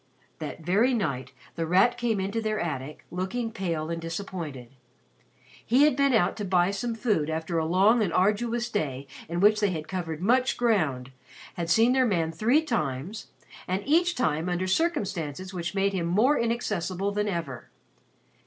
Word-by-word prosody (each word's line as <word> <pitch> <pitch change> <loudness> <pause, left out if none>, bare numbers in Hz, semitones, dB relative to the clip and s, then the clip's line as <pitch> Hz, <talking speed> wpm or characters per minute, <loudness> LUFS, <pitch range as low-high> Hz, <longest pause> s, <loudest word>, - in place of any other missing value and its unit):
That - - -6
very 210 +10 +2
night 130 - -2 0.2
The 165 -1 -3
Rat 195 +8 +4
came 240 -4 -1
in 190 +1 -2
to 225 +2 -1
their 215 -1 -1
attic 150 -3 -5
looking 220 +6 -3
pale 170 -7 -3
and 165 0 -3
disappointed. 165 -7 -6 0.9
He 255 +5 +4
had 300 -3 +4
been 280 0 +3
out 180 -5 +2
to 210 - -4
buy 180 -1 +2
some 225 +4 -3
food 210 -10 0
after 160 +1 -2
a 160 - -1
long 200 +7 +4
and 195 -5 0
arduous 230 +6 +1
day 140 -9 -2 0.2
in 170 +1 -2
which 210 +1 +5
they 205 -1 +2
had 155 -4 -4
covered 165 -5 -4
much 250 +7 +2
ground, 155 - 0 0.4
had 170 -1 -4
seen 225 +7 +4
their 260 -1 +3
man 165 -6 0
three 240 - +2
times, 155 - -3 0.4
and 185 +2 -1
each 345 +4 +3
time 160 -6 0
under 180 +1 -1
circumstances 190 - -1
which 175 +1 -4
made 195 0 +1
him 175 -3 -1
more 220 +12 +3
inaccessible 200 -5 -1
than 210 +1 -1
ever. 165 -10 -4
190 Hz, 170 wpm, -27 LUFS, 165-225 Hz, 0.9 s, which